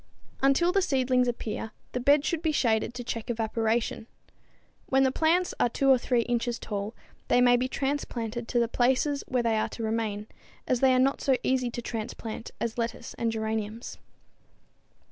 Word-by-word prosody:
Until 275 +6 +4
the 390 +1 +3
seedlings 255 -5 +2
appear, 225 -2 -3 0.2
the 250 - -2
bed 285 +3 +4
should 335 -3 -1
be 320 -2 +1
shaded 230 -4 +1
to 245 - -5
check 230 -1 -5
evaporation. 225 0 -1 0.8
When 265 0 +3
the 265 - +3
plants 335 +5 +2
are - - +3
2 270 +3 +3
or 260 - +5
3 245 -1 +1
inches 240 0 -1
tall 205 +1 -4 0.3
they - - +4
may 245 0 +6
be 250 +1 +1
transplanted 245 -4 -3
to 245 - -1
the 235 -1 +3
places 260 +4 +1
where 250 -2 0
they 225 -1 +2
are - - -1
to 230 - -6
remain, 220 -2 -2 0.4
as 255 - +2
they 260 0 +5
are - - +3
not 265 +2 +2
so 270 - +3
easy 255 -2 +1
to 240 0 -6
transplant 225 0 -5
as 235 +1 -3
lettuce 230 0 -3
and 230 -1 +1
geraniums. 220 0 -4
240 Hz, 180 wpm, -28 LUFS, 225-265 Hz, 0.8 s, may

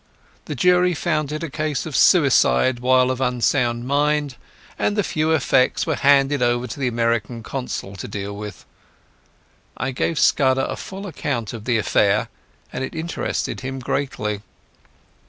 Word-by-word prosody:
The 150 - -5
jury 180 +4 +3
found 155 -2 -1
it 155 +2 -4
a 165 - -3
case 155 -3 -2
of 155 -4 -5
suicide 130 - +4
while 130 +1 +3
of 130 0 -4
unsound 120 -1 +1
mind, 145 0 +1 0.4
and 205 - +1
the 205 - +1
few 155 -3 -1
effects 135 -5 +2
were 160 - 0
handed 140 -1 +3
over 120 0 +1
to 125 +3 -7
the 135 - 0
American 115 -1 -1
Consul 125 -7 -5
to - - -6
deal 100 0 -5
with. 105 0 -8 1.1
I 135 - -2
gave 155 +5 -1
Scudder 135 -2 +3
a - - -4
full 195 +1 -8
account 130 - -3
of 110 -2 -8
the 120 -2 +2
affair, 110 - +2 0.4
and 130 - -3
it 130 - -6
interested 160 +1 -3
him 135 0 -5
greatly. 105 -6 -3
130 Hz, 155 wpm, -21 LUFS, 120-150 Hz, 1.1 s, suicide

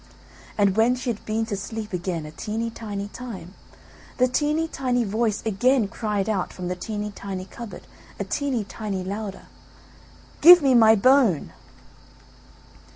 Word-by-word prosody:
And 200 -2 +3
when 235 +3 +4
she 250 -1 -2
had 215 - -8
been 220 +1 -1
to 220 -2 -3
sleep 210 +1 -6
again 175 -3 -3
a 150 - -8
teeny 220 +8 -4
tiny 205 -3 -5
time, 205 -8 -8 0.6
the 255 - +4
teeny 300 +5 0
tiny 250 -5 -1
voice 215 0 -1
again 230 +2 +2
cried 210 -1 -2
out 200 -4 -1
from 180 -1 -6
the 180 - -2
teeny 210 +2 -4
tiny 190 -2 -6
cupboard 225 +3 -10 0.3
a - - -1
teeny 275 -6 -1
tiny 200 -2 -5
louder, 200 +1 -5 1.0
"Give 350 +3 +11
me 270 -2 +4
my 225 -2 +7
bone!" 240 - +3
215 Hz, 150 wpm, -24 LUFS, 195-245 Hz, 1.0 s, Give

